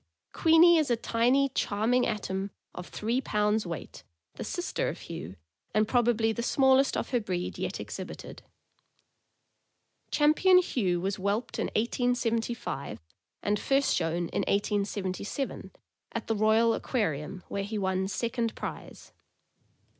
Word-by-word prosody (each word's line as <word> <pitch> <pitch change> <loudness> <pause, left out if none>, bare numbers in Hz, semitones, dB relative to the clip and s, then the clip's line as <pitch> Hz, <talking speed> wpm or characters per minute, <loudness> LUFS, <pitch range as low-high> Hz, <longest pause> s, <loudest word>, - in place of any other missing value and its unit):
Queenie 330 +1 +6
is 300 -3 0
a 240 - +3
tiny, 245 +4 +2
charming 245 +1 +1
atom 195 -1 -2 0.2
of 180 - -7
three 235 +5 -1
pounds 210 -3 0
weight, 170 -2 -7 0.3
the - - -6
sister - - -2
of - - -7
Hugh, 90 +4 -7 0.4
and 215 0 +3
probably 235 -2 +2
the 235 - -3
small 265 +2 +4
est 275 - +1
of - - -5
her 245 - +2
breed 180 -4 -4
yet - - -3
exhibited. - - -7 1.7
Champion 310 +5 +5
Hugh 200 - +1
was 190 +2 -2
whelped 200 +5 -2
in - - 0
1875, 230 - -1 0.4
and 205 0 +1
first 275 +4 +2
shown 170 +1 0
in - - -1
1877, 200 +4 -2 0.4
at - - -3
the 225 - 0
Royal 220 +2 +4
Aquarium, 185 - -2
where 200 - -3
he 215 +2 -4
won 190 -1 0
second 230 +3 -2
prize. - - -8
220 Hz, 130 wpm, -29 LUFS, 195-245 Hz, 1.7 s, Queenie